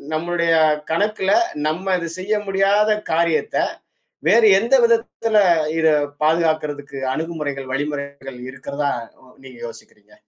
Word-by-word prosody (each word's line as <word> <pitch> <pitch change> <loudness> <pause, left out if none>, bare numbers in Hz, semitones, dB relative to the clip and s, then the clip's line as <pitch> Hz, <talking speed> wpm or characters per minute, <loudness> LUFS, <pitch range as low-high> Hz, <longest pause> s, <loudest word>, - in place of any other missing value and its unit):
நம்முடைய 170 +1 0 0.4
கணக்குல, 200 +2 0 0.4
நம்ம 185 +4 -1
இது 170 - -4
செய்ய 195 +4 -2 0.2
முடியாத 200 +2 +2 0.2
காரியத்தை 170 - +1 0.6
வேறு 230 -1 +6
எந்த 235 +6 +2
விதத்துல 230 -1 +1 0.4
இதைப் 150 -2 +1
பாதுகாக்குறதுக்கு 155 -3 0 0.2
அணுகுமுறைகள், 150 -4 -4
வழிமுறைகள் 140 -2 -5
இருக்கிறதா 140 +2 -3 0.5
நீங்க 130 -2 -13
யோசிக்கிறீங்க? 105 -2 -15
160 Hz, 100 wpm, -20 LUFS, 140-195 Hz, 0.6 s, வேறு